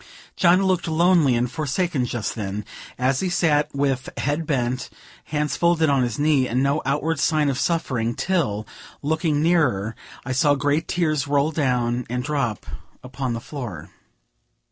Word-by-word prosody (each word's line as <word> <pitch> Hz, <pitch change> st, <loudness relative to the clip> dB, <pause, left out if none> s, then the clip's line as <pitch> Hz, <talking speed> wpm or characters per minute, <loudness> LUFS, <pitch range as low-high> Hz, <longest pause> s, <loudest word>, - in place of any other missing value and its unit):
John 180 Hz, +2 st, +4 dB
looked 185 Hz, -3 st, +1 dB
lonely 165 Hz, -4 st, +4 dB
and 120 Hz, +1 st, +1 dB
forsaken 150 Hz, -2 st, -1 dB
just 120 Hz, -3 st, -3 dB
then, 105 Hz, -1 st, -4 dB, 0.3 s
as 130 Hz, +1 st, +1 dB
he 190 Hz, -, -1 dB
sat 155 Hz, -5 st, +2 dB
with 135 Hz, -2 st, 0 dB
bent 150 Hz, +3 st, -2 dB
head, 125 Hz, -2 st, -1 dB, 0.4 s
hands 150 Hz, -1 st, -1 dB
folded 170 Hz, -3 st, +3 dB
on 135 Hz, -2 st, +3 dB
his 120 Hz, -3 st, -1 dB
knee, 145 Hz, -3 st, +2 dB
and 125 Hz, +3 st, 0 dB
no 140 Hz, +2 st, +1 dB
outward 150 Hz, +3 st, 0 dB
sign 155 Hz, -1 st, +2 dB
of 135 Hz, -1 st, -1 dB
suffering, 125 Hz, -10 st, 0 dB
till, 140 Hz, -, -1 dB, 0.4 s
looking 155 Hz, 0 st, 0 dB
nearer, 130 Hz, -, +2 dB, 0.3 s
I 130 Hz, -, -4 dB
saw 145 Hz, +3 st, +3 dB
great 145 Hz, +3 st, 0 dB
tears 155 Hz, -6 st, 0 dB
roll 145 Hz, +2 st, +2 dB
down 125 Hz, -5 st, 0 dB
and 125 Hz, +1 st, -2 dB
drop 135 Hz, -6 st, -2 dB, 0.4 s
upon 130 Hz, -1 st, -3 dB
the 115 Hz, -, -3 dB
floor. 120 Hz, -, -7 dB
140 Hz, 155 wpm, -23 LUFS, 125-160 Hz, 0.4 s, John